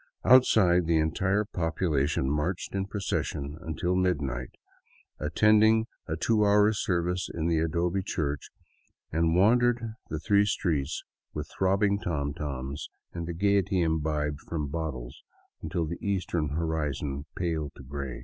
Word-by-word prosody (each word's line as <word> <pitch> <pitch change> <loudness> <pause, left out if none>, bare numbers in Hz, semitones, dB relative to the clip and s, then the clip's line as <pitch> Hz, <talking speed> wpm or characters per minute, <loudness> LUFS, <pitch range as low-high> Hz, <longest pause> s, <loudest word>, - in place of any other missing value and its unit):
Out 130 0 +8
side, 90 -5 +3
the 85 -1 +3
entire 95 +6 +1
population 80 -7 0
marched 75 +6 -1
in 95 0 -1
procession 75 -8 -3
until 80 +2 -2
midnight, 70 -9 0 0.7
at 75 +1 -4
tended 110 +1 +5 0.2
a 80 - -1
two 105 +5 +2
hour 105 +1 +5
service 90 -2 -1
in 80 -1 -3
the 85 -1 +2
adobe 85 +4 0
church, 75 -7 -3 0.6
and 80 +1 +2
wandered 115 +3 +3 0.2
the 80 - -3
three 100 +3 +3
streets 80 -8 -1 0.3
with - - -5
throbbing 100 +2 +2
tomtoms 70 -4 -3 0.2
and 85 -1 -4
the 85 - -3
gaiety 100 0 +2
imbibed 75 -3 0
from 75 -4 -4
bot 80 0 -2
tles - - -9 0.4
until 85 - -2
the 85 +2 -5
eastern 90 -6 -1
horizon 75 -2 -2
paled 80 -5 -2
to - - -12
gray. 70 -2 -5
85 Hz, 140 wpm, -28 LUFS, 75-100 Hz, 0.7 s, Out